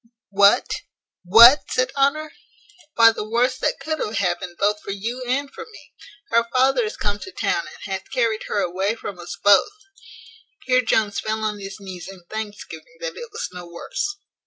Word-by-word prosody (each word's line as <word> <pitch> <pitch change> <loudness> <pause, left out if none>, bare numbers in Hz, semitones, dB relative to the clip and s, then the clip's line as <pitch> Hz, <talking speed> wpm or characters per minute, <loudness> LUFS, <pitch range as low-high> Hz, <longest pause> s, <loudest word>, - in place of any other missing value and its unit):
"What? 200 0 +5 0.6
What?" 230 +9 +9
said 255 +1 0
Honour: 285 +3 +1 0.6
"Why, 230 0 +7
the 215 -1 -6
worst 245 +3 +1
that - - 0
could 315 0 -3
have 215 - -3
happened 175 -2 -2
both 210 +1 +1
for - - -11
you 225 +6 -4
and 275 +3 -1
for - - -8
me. - - -16 0.4
Her 230 0 +3
father 260 -1 +3
is 215 - -6
come 205 0 -2
to 380 - -9
town, - - -1
and - - -12
hath 190 -1 -5
carried 230 -4 0
her 205 - 0
away 190 +5 -1
from 200 -5 -8
us 175 - -8
both." 205 - +5 0.9
Here 255 0 +3
Jones 215 -5 +1
fell 220 +3 -3
on 210 -1 -2
his 195 +1 -8
knees 185 -3 -9
in 185 -2 -15
thanksgiving 220 - -8
that - - -5
it 475 -1 -8
was 445 - -5
no 180 -1 -9
worse. 400 - -4
220 Hz, 185 wpm, -22 LUFS, 200-255 Hz, 0.9 s, What